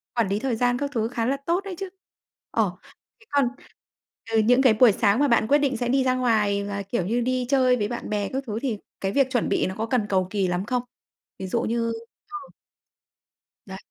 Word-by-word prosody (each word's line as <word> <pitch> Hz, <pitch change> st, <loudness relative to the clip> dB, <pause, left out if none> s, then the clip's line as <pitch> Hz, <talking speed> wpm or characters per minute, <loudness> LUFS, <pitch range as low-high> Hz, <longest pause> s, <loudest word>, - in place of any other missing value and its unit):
quản 230 Hz, -4 st, +2 dB
lý 200 Hz, +2 st, -1 dB
thời 250 Hz, -1 st, -1 dB
gian 245 Hz, +1 st, +1 dB
các 285 Hz, +2 st, -3 dB
thứ 225 Hz, -1 st, 0 dB
khá 235 Hz, -1 st, -2 dB
là 275 Hz, +3 st, 0 dB
tốt 350 Hz, +3 st, +1 dB
đấy 390 Hz, -2 st, -6 dB
chứ! 390 Hz, +1 st, -5 dB, 0.6 s
Ờ, -, -, +1 dB, 0.5 s
thế 445 Hz, -, -21 dB
còn 280 Hz, -3 st, +2 dB, 0.8 s
từ 225 Hz, -, +2 dB
những 245 Hz, +4 st, +4 dB
cái 255 Hz, -5 st, +5 dB
buổi 225 Hz, 0 st, +6 dB
sáng 205 Hz, +3 st, +2 dB
mà 290 Hz, -, +4 dB
bạn 235 Hz, -3 st, +3 dB
quyết 290 Hz, -, +5 dB
định 275 Hz, -4 st, 0 dB
sẽ 245 Hz, 0 st, -2 dB
đi 265 Hz, +1 st, +3 dB
ra 255 Hz, -1 st, +2 dB
ngoài 215 Hz, -5 st, +1 dB
và, 200 Hz, 0 st, -4 dB
kiểu 195 Hz, -2 st, -2 dB
như, 235 Hz, +5 st, 0 dB
đi 255 Hz, 0 st, 0 dB
chơi 255 Hz, -2 st, +4 dB
với 205 Hz, -3 st, -1 dB
bạn 240 Hz, -, -5 dB
bè 205 Hz, -2 st, -1 dB
các 270 Hz, +1 st, -2 dB
thứ 215 Hz, +1 st, -3 dB
thì 245 Hz, -6 st, -1 dB, 0.2 s
cái 195 Hz, 0 st, -1 dB
việc 275 Hz, +1 st, +3 dB
chuẩn 245 Hz, -4 st, 0 dB
bị -, -, +1 dB
nó 190 Hz, -, -5 dB
có 220 Hz, -, -1 dB
cần 225 Hz, -3 st, 0 dB
cầu 185 Hz, -2 st, +1 dB
kì 195 Hz, -2 st, 0 dB
lắm 180 Hz, +2 st, -1 dB
không? 250 Hz, +2 st, -1 dB, 0.6 s
Ví 190 Hz, -, -4 dB
dụ 235 Hz, +5 st, 0 dB
như 230 Hz, 0 st, -1 dB, 0.4 s
ờ. 405 Hz, -, -6 dB, 1.3 s
Đấy. 190 Hz, 0 st, -8 dB
235 Hz, 235 wpm, -24 LUFS, 210-260 Hz, 1.3 s, buổi